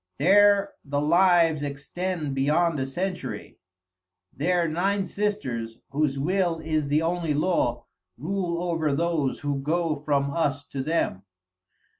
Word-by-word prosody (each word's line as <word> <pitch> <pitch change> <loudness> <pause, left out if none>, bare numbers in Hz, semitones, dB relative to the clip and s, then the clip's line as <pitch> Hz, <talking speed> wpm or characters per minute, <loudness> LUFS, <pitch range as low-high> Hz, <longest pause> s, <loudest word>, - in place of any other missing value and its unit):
There 200 +4 +4
the 145 0 -2
lives 165 0 +4
extend 145 +2 -3
beyond 150 +4 +1
a 130 - -2
century. 180 +7 -5 0.8
There 170 +4 +1
nine 190 +5 0
sisters, 130 - -3
whose 140 -1 0
will 175 +3 +1
is 155 -2 -1
the 150 +3 +2
only 165 -2 0
law, 145 -7 0 0.3
rule 175 +3 -2
over 165 -5 0
those 160 -4 -1
who 145 -1 -1
go 165 +2 0
from 140 -1 0
us 145 -3 -1
to 135 - -4
them. 150 - -1
160 Hz, 125 wpm, -25 LUFS, 140-175 Hz, 0.8 s, There